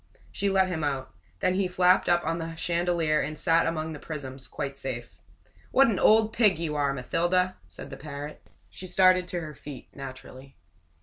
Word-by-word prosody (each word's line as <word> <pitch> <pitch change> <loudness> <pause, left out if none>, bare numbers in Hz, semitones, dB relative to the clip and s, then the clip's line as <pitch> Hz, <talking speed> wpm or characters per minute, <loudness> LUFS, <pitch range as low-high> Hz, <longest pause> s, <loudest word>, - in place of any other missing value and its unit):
She 200 - 0
let 190 -1 +3
him 170 -4 -3
out. 135 -8 -2 0.3
Then 185 - +2
he 190 0 +1
flapped 180 +1 +3
up 175 0 +3
on 165 +1 -1
the 165 0 -5
chandelier 170 -2 +1
and 155 +2 -4
sat 165 +2 +3
among 160 -1 -2
the 150 - -8
prisms, 135 -4 -7
quite 140 0 -5
safe. 130 -4 -6 0.5
"What 270 -1 +5
an 205 - 0
old 220 0 +5
pig 210 -7 +4
you 165 -2 -3
are, 145 -2 +1
Mathilda!" 175 +8 0
said - - -10
the 135 - -7
parrot. 145 0 -7 0.3
She 185 - -8
started 185 0 +4
to 175 -1 -3
her 155 -2 -7
feet 145 -2 -10
naturally. 135 0 -10
165 Hz, 185 wpm, -27 LUFS, 140-180 Hz, 0.5 s, What